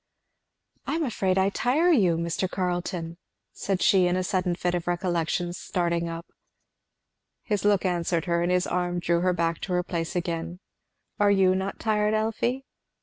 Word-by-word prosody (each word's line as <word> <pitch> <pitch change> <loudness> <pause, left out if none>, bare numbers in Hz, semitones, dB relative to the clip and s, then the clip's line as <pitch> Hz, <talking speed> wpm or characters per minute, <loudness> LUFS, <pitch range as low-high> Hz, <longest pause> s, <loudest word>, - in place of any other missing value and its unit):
"I - - 0
am 330 - 0
afraid 195 -8 0
I 190 +1 +3
tire 290 - +2
you, 185 - +3
Mr. 170 +2 -1
Carleton!" 175 -2 -3 0.4
said 195 -2 -2
she 185 -2 +5
in 175 - +1
a 185 - 0
sudden 180 -1 0
fit 175 0 -1
of 175 -1 -2
recollection, 175 -1 -1
starting 170 -1 -1
up. 165 +1 -6 1.2
His 210 -3 -1
look 205 -2 +3
answered 175 -1 0
her, 170 -1 +1
and 175 +1 +1
his 180 0 +2
arm 175 0 -1
drew 170 0 +1
her 185 +1 +2
back 165 -1 -1
to 185 - -3
her 180 0 +1
place 170 -2 -4
again. 170 0 -3 0.6
"Are 205 0 +4
you 190 -2 +4
not 190 +1 -2
tired, 210 -1 +1
Elfie?" 225 +4 -1
180 Hz, 170 wpm, -26 LUFS, 170-195 Hz, 1.2 s, she